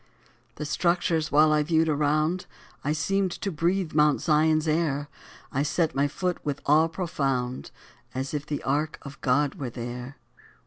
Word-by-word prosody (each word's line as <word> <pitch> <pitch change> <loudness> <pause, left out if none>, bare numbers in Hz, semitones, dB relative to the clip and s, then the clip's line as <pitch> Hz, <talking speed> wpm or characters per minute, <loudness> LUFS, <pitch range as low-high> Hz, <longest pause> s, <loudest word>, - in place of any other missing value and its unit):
_" - - -38
The 150 - -5
structures 165 0 +1
while 155 +1 +5
I 150 - +3
viewed 160 +1 +2
around, 155 +4 +1 0.4
I 145 - 0
seemed 190 +5 +1
to 195 - -3
breathe 170 +2 0
Mount's 150 -1 +3
Zion's 155 0 +3
air; 150 -3 0 0.4
I 135 - 0
set 155 +2 +1
my 140 +1 +2
foot 180 +4 -3
with 145 -2 -2
awe 155 +3 +5
profound, 135 -7 -2 0.5
As 130 +2 -3
if 145 -1 -2
the 145 -1 -3
ark 150 +3 0
of 140 -1 -10
God 140 +2 +2
were 135 -3 -3
there. 125 +2 -7
150 Hz, 165 wpm, -26 LUFS, 140-160 Hz, 0.5 s, while